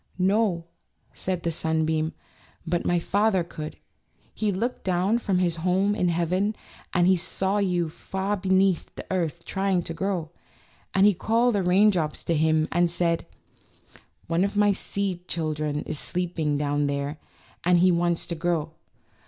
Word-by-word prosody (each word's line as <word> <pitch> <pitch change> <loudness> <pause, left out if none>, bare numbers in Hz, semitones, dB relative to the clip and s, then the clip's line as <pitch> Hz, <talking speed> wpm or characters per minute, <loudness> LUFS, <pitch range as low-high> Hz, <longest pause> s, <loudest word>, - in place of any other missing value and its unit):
"No," 190 -2 +2 0.5
said 185 -2 -3
the 170 - 0
sunbeam, 160 0 0 0.5
"but 170 0 -1
my 175 - +3
Father 195 +2 +2
could. 155 -2 -7 0.6
He 215 -2 0
looked 230 +7 -2
down 190 +5 +1
from 195 -5 0
his 175 -2 +1
home 185 +4 +2
in 180 -4 +1
heaven, 180 +5 0 0.4
and 175 0 +3
he 185 +1 +5
saw 190 +3 -1
you 180 -4 +1
far 190 +5 -3
beneath 190 -2 +2
the - - -7
earth 170 -3 -2
trying 190 -2 0
to 165 - -4
grow, 175 -3 -2 0.6
and 195 +1 +5
he 210 - +6
called 230 +6 +2
the 200 - +1
rain 190 +4 +5
drops 160 -5 -2
to 170 - 0
him 155 0 +2
and 175 0 +3
said: 170 -1 0 1.0
^One 165 +2 +2
of 200 +1 -1
my 205 0 +5
seed 190 -2 -3
children 155 -2 -2
is 150 - -3
sleeping 170 -5 -1
down 145 0 0
there, 140 +1 -3 0.4
and 180 0 +4
he 180 +1 +5
wants 170 0 +1
to 170 - -4
grow. 165 -2 -1
175 Hz, 160 wpm, -26 LUFS, 165-195 Hz, 1.0 s, he